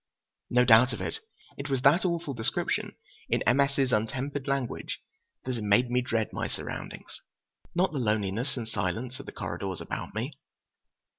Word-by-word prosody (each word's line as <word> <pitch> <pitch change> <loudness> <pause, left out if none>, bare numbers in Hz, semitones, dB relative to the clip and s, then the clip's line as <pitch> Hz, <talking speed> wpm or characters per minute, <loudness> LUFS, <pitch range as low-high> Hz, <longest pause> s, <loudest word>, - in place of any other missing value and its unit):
No 125 0 +5
doubt 120 +1 +7
of - - -4
it, - - -2 0.4
it 140 +1 -4
was 135 -2 0
that 170 +8 +6
awful 170 -5 0
description 115 -2 -1 0.3
in - - +2
M. 120 +3 +4
S.'s 140 -2 +3
untempered 135 +6 -1
language 140 -3 -1 0.5
that 130 - -1
had 115 -3 -3
made 120 +4 +4
me 125 0 +3
dread 115 -3 -1
my - - -1
surroundings, - - -6 0.5
not 185 +2 +3
the 145 - -2
loneliness 110 +3 0
and 115 -2 -3
silence 115 +5 -2
of 140 - -9
the - - -5
corridors 95 -5 -4
about - - -5
me. 125 +7 -2
125 Hz, 165 wpm, -29 LUFS, 110-140 Hz, 0.5 s, doubt